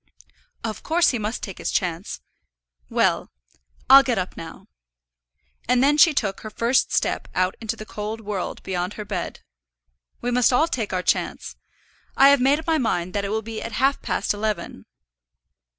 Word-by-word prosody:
"Of 220 Hz, -2 st, -4 dB
course 340 Hz, +2 st, +3 dB
he 240 Hz, -, -1 dB
must 215 Hz, +3 st, -4 dB
take 195 Hz, -, -7 dB
his -, -, -3 dB
chance. 180 Hz, 0 st, -2 dB, 0.7 s
Well, -, -, +1 dB, 0.6 s
I'll 270 Hz, +1 st, +10 dB
get 250 Hz, -4 st, -1 dB
up 185 Hz, -1 st, -3 dB
now." 165 Hz, -1 st, -10 dB, 1.0 s
And 250 Hz, 0 st, +4 dB
then 290 Hz, +2 st, +4 dB
she 330 Hz, -, +8 dB
took 210 Hz, -9 st, -1 dB
her 215 Hz, -, -7 dB
first 235 Hz, +4 st, +1 dB
step -, -, 0 dB
out 185 Hz, 0 st, +1 dB
into 225 Hz, 0 st, -3 dB
the 215 Hz, -, -9 dB
cold 215 Hz, +1 st, -5 dB
world 205 Hz, -4 st, -5 dB
beyond 180 Hz, +1 st, -3 dB
her 210 Hz, -, -6 dB
bed. 200 Hz, -2 st, -5 dB, 0.8 s
"We 245 Hz, -, -2 dB
must 250 Hz, +1 st, +3 dB
all 280 Hz, +6 st, +3 dB
take 240 Hz, -11 st, -3 dB
our 185 Hz, -1 st, -1 dB
chance. -, -, -1 dB, 0.6 s
I 275 Hz, -, +8 dB
have 280 Hz, -2 st, +4 dB
made 275 Hz, +3 st, +4 dB
up 320 Hz, -, -8 dB
my 325 Hz, -2 st, +2 dB
mind 180 Hz, -7 st, -1 dB
that 200 Hz, -1 st, -1 dB
it -, -, -3 dB
will 220 Hz, +1 st, -2 dB
be 225 Hz, 0 st, -6 dB
at 230 Hz, -, -6 dB
half 270 Hz, +5 st, +1 dB
past -, -, -1 dB
eleven." 205 Hz, -, -4 dB
220 Hz, 180 wpm, -23 LUFS, 195-255 Hz, 1.0 s, I'll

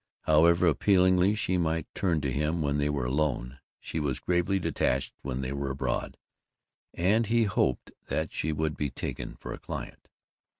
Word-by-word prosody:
However 85 Hz, +3 st, +4 dB
appealingly 95 Hz, +3 st, +4 dB
she 95 Hz, -4 st, 0 dB
might 80 Hz, -2 st, 0 dB
turn 85 Hz, -5 st, 0 dB
to 70 Hz, -1 st, -1 dB
him 75 Hz, +4 st, 0 dB
when 70 Hz, 0 st, 0 dB
they 75 Hz, 0 st, +1 dB
were 70 Hz, -4 st, -1 dB
alone, 65 Hz, -1 st, -1 dB, 0.2 s
she 80 Hz, -, -4 dB
was 70 Hz, -4 st, -1 dB
gravely 90 Hz, +2 st, +1 dB
detached 65 Hz, -6 st, 0 dB
when 65 Hz, -1 st, -3 dB
they 65 Hz, +1 st, -3 dB
were 70 Hz, 0 st, -3 dB
abroad, 65 Hz, -, -2 dB, 0.8 s
and 105 Hz, +6 st, +2 dB
he 115 Hz, +1 st, +3 dB
hoped 95 Hz, -, 0 dB, 0.2 s
that 80 Hz, 0 st, -2 dB
she 80 Hz, -, -1 dB
would 75 Hz, 0 st, -1 dB
be 75 Hz, -, -2 dB
taken 65 Hz, -, -5 dB
for -, -, -7 dB
a -, -, -8 dB
client. -, -, -7 dB
80 Hz, 170 wpm, -28 LUFS, 70-90 Hz, 0.8 s, However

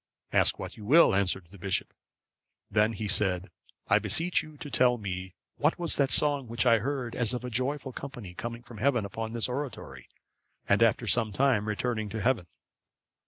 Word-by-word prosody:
—"Ask -, -, +3 dB
what -, -, -7 dB
you 105 Hz, -, -10 dB
will," 155 Hz, +4 st, +6 dB
answered 95 Hz, -1 st, 0 dB
the 100 Hz, -, -14 dB
bishop. 95 Hz, 0 st, -2 dB, 0.8 s
Then 110 Hz, +2 st, +3 dB
he 110 Hz, 0 st, -4 dB
said, 95 Hz, -2 st, +1 dB, 0.4 s
"I -, -, +4 dB
beseech 175 Hz, +2 st, +3 dB
you 155 Hz, -1 st, -13 dB
to 145 Hz, -1 st, -8 dB
tell 125 Hz, -1 st, +3 dB
me 95 Hz, -3 st, -5 dB, 0.2 s
what 150 Hz, +3 st, +1 dB
was 175 Hz, -2 st, -1 dB
that 140 Hz, -2 st, +2 dB
song 145 Hz, -3 st, +2 dB
which 115 Hz, +2 st, -1 dB
I 115 Hz, -2 st, +5 dB
heard 130 Hz, 0 st, -3 dB
as 120 Hz, 0 st, +1 dB
of 125 Hz, 0 st, -5 dB
a 125 Hz, -, -5 dB
joyful 130 Hz, +3 st, -2 dB
company 120 Hz, -10 st, -8 dB
coming 115 Hz, +5 st, -6 dB
from 120 Hz, -3 st, -12 dB
heaven 125 Hz, -5 st, +2 dB
upon 110 Hz, +3 st, -5 dB
this 115 Hz, -1 st, +1 dB
oratory, 130 Hz, +1 st, -6 dB, 0.6 s
and -, -, +3 dB
after -, -, +3 dB
some 115 Hz, -3 st, +1 dB
time 115 Hz, -2 st, +2 dB
returning 110 Hz, 0 st, -2 dB
to 110 Hz, +2 st, -4 dB
heaven?" 115 Hz, -6 st, 0 dB
115 Hz, 185 wpm, -28 LUFS, 105-135 Hz, 0.8 s, will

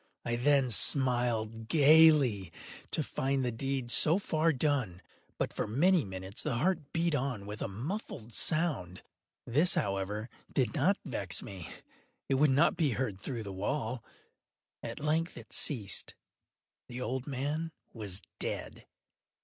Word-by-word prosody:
I 120 Hz, -, 0 dB
then 135 Hz, 0 st, +2 dB
smiled 115 Hz, -3 st, +3 dB
gaily, 145 Hz, -, +5 dB, 0.4 s
to -, -, 0 dB
find 135 Hz, -1 st, -1 dB
the 120 Hz, -, 0 dB
deed 130 Hz, +1 st, -2 dB
so 160 Hz, +7 st, +6 dB
far 165 Hz, -4 st, +1 dB
done. 130 Hz, -, -1 dB, 0.3 s
But, -, -, -2 dB
for -, -, -2 dB
many 165 Hz, -, +3 dB
minutes, 95 Hz, +1 st, -5 dB
the 145 Hz, -5 st, -2 dB
heart 150 Hz, +1 st, -1 dB
beat 170 Hz, 0 st, 0 dB
on 125 Hz, -7 st, -2 dB
with 105 Hz, +1 st, -7 dB
a -, -, -1 dB
muffled 120 Hz, -, -6 dB
sound. 140 Hz, -, 0 dB, 0.4 s
This, 155 Hz, +9 st, +3 dB
however, 100 Hz, +2 st, -2 dB, 0.2 s
did 125 Hz, -5 st, 0 dB
not 180 Hz, +7 st, +2 dB
vex 100 Hz, -, -2 dB
me; 95 Hz, -4 st, -8 dB, 0.6 s
it -, -, +1 dB
would 150 Hz, -, +5 dB
not 145 Hz, +6 st, +3 dB
be 150 Hz, -7 st, +1 dB
heard 105 Hz, -6 st, -3 dB
through 120 Hz, -2 st, -4 dB
the 100 Hz, -2 st, -7 dB
wall. 115 Hz, +4 st, -3 dB, 0.8 s
At -, -, -6 dB
length 160 Hz, +3 st, -1 dB
it -, -, -11 dB
ceased. 105 Hz, -10 st, 0 dB, 0.7 s
The 125 Hz, 0 st, -7 dB
old 125 Hz, +2 st, -3 dB
man 145 Hz, +4 st, -2 dB, 0.2 s
was 100 Hz, -5 st, -4 dB, 0.2 s
dead. -, -, -4 dB
130 Hz, 140 wpm, -31 LUFS, 110-150 Hz, 0.8 s, so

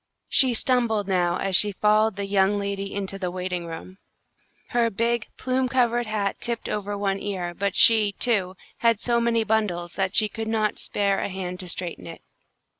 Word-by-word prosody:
She 255 Hz, -3 st, +4 dB
stumbled 225 Hz, -4 st, +1 dB
now 180 Hz, -2 st, +1 dB
as 195 Hz, -1 st, +1 dB
she 205 Hz, +3 st, +4 dB
followed 215 Hz, +1 st, +2 dB
the 200 Hz, 0 st, -3 dB
young 195 Hz, 0 st, +2 dB
lady 200 Hz, 0 st, -3 dB
into 195 Hz, -1 st, -4 dB
the 180 Hz, -2 st, -2 dB
waiting 180 Hz, -1 st, -4 dB
room. 175 Hz, +4 st, -9 dB, 0.7 s
Her 235 Hz, -2 st, +2 dB
big, 230 Hz, +2 st, -1 dB
plume 255 Hz, 0 st, 0 dB
covered 240 Hz, -2 st, +1 dB
hat 205 Hz, -2 st, -2 dB
tipped 235 Hz, -1 st, -3 dB
over 205 Hz, -1 st, -3 dB
one 195 Hz, -1 st, -1 dB
ear, 185 Hz, -4 st, -4 dB
but 200 Hz, +2 st, -2 dB
she, 215 Hz, -3 st, +5 dB
too, 195 Hz, -7 st, +1 dB, 0.2 s
had 230 Hz, -3 st, +3 dB
so 235 Hz, +1 st, +1 dB
many 230 Hz, -1 st, +2 dB
bundles, 205 Hz, -6 st, -1 dB
that 190 Hz, 0 st, -1 dB
she 215 Hz, -, +4 dB
could 225 Hz, +1 st, -6 dB
not 215 Hz, -2 st, 0 dB
spare 200 Hz, -1 st, 0 dB
a -, -, -2 dB
hand 180 Hz, -1 st, -5 dB
to 180 Hz, -, -5 dB
straighten 170 Hz, -, -5 dB
it. -, -, -10 dB
205 Hz, 185 wpm, -24 LUFS, 190-225 Hz, 0.7 s, she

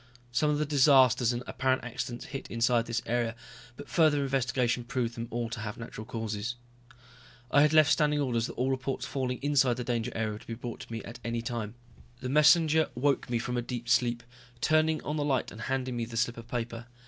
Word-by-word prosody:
Some 150 Hz, +5 st, +2 dB
of 150 Hz, -, +1 dB
the 150 Hz, -, 0 dB
disasters 130 Hz, -4 st, +5 dB
and 120 Hz, 0 st, -3 dB
apparent 130 Hz, 0 st, 0 dB
accidents 120 Hz, -1 st, -5 dB
hit 135 Hz, -, -7 dB
inside 115 Hz, 0 st, +2 dB
this 120 Hz, 0 st, -2 dB
area, 120 Hz, -1 st, 0 dB, 0.4 s
but 145 Hz, -, -9 dB
further 155 Hz, -4 st, +3 dB
investigation 125 Hz, -2 st, 0 dB
proved 120 Hz, -1 st, -2 dB
them 115 Hz, 0 st, -5 dB
all 120 Hz, 0 st, -2 dB
to 115 Hz, -, -4 dB
have 105 Hz, -1 st, -5 dB
natural 115 Hz, -2 st, -8 dB
causes. 110 Hz, +1 st, -4 dB, 1.0 s
I 145 Hz, -, +6 dB
had 150 Hz, 0 st, +5 dB
left 155 Hz, 0 st, +6 dB
standing 150 Hz, -2 st, +3 dB
orders 120 Hz, -5 st, 0 dB
that -, -, -7 dB
all 130 Hz, +2 st, 0 dB
reports 135 Hz, 0 st, -2 dB
falling 130 Hz, -2 st, -2 dB
inside 135 Hz, -4 st, +3 dB
the 125 Hz, -, -3 dB
danger 120 Hz, -2 st, -1 dB
area 110 Hz, -1 st, -1 dB
were 105 Hz, -, -7 dB
to -, -, -17 dB
be 115 Hz, -, -4 dB
brought 120 Hz, 0 st, -7 dB
to -, -, -10 dB
me 115 Hz, -1 st, -4 dB
at 115 Hz, -, -9 dB
any 115 Hz, 0 st, -2 dB
time. 115 Hz, -2 st, -4 dB, 0.4 s
The 130 Hz, -, -4 dB
messenger 155 Hz, +2 st, +5 dB
woke 140 Hz, +2 st, +1 dB
me 120 Hz, -, +1 dB
from 125 Hz, +1 st, -2 dB
a -, -, +1 dB
deep 120 Hz, 0 st, -5 dB
sleep, 120 Hz, -1 st, +2 dB, 0.4 s
turning 155 Hz, +5 st, +2 dB
on 150 Hz, +2 st, -2 dB
the 145 Hz, -, 0 dB
light 140 Hz, -3 st, 0 dB
and 110 Hz, -, -9 dB
handing 130 Hz, 0 st, -2 dB
me 115 Hz, -, -1 dB
the 115 Hz, 0 st, -7 dB
slip 120 Hz, 0 st, 0 dB
of 115 Hz, 0 st, -9 dB
paper. 120 Hz, -1 st, -4 dB
125 Hz, 220 wpm, -29 LUFS, 115-140 Hz, 1.0 s, I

